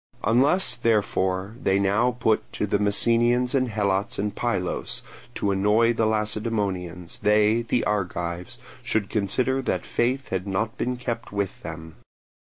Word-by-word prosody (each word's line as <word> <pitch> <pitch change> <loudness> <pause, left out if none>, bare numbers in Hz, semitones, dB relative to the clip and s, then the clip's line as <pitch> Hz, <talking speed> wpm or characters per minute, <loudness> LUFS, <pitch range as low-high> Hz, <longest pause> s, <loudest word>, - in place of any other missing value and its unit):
Unless, 130 - +3
therefore, 100 -3 0
they 95 - +2
now 100 +5 +2
put 110 -2 +1
the 100 0 0
Messenians 120 +4 +3
and 130 -2 +2
Helots 100 -2 0
in 105 +1 -1
Pylos 100 -7 -2 0.3
to 100 - 0
annoy 105 +4 +3
the 115 -1 +1
Lacedaemonians, 105 -5 -2
they, 105 +2 +3
the 120 +1 0
Argives, 90 -3 -2 0.2
should 110 -3 -1
consider 125 +6 0
that 130 - -2
faith 130 +3 -1
had 95 +1 -2
not 110 +3 -1
been 125 0 -2
kept 120 -2 -4
with 100 -2 -3
them. 80 0 -8
105 Hz, 135 wpm, -25 LUFS, 95-120 Hz, 0.3 s, Unless